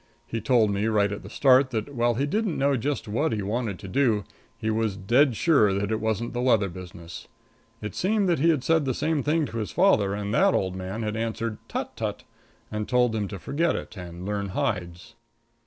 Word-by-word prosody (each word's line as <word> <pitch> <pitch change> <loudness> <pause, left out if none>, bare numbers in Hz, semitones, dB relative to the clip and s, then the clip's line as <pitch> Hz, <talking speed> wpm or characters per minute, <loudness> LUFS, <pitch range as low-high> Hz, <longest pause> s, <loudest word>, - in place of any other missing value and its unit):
He 115 - -4
told 115 -2 +3
me 100 +2 0
right 105 -2 +2
at 105 - -5
the - - -10
start 130 -1 +4
that, 115 +3 -3
while 120 -1 +1
he 135 +4 0
didn't 205 +3 -1
know 140 +1 +2
just 135 +1 -2
what 120 +9 0
he 105 -2 -2
wanted 105 -1 -2
to 95 - -9
do, 115 -2 +2 0.3
he 110 - -1
was 110 -3 0
dead 120 +7 +3
sure 110 -10 +3
that 100 +2 -1
it 110 - 0
wasn't 110 +2 -2
the 120 - -2
leather 115 -6 +3
business. 85 -1 -10 0.6
It 105 - -4
seemed 200 +1 +1
that 170 -4 +2
he 165 +4 +4
had 150 -6 +2
said 160 +1 +2
the 130 -2 -1
same 155 -1 0
thing 155 +2 +1
to 115 - -6
his 105 - -3
father 110 - +3
and 105 0 -3
that - - +4
the - - +3
old 95 -1 -2
man 95 +4 -4
had 105 0 -2
answered, 115 -1 -3
"Tut, - - -4
tut," - - -4 0.5
and 105 -1 -3
told 125 -2 +3
him 105 -2 -1
to 100 - -6
forget 145 - 0
it - - -6
and 90 -1 -8
to 105 - -2
learn 100 -1 -2
hides. 90 -3 -3
110 Hz, 225 wpm, -26 LUFS, 100-135 Hz, 0.6 s, start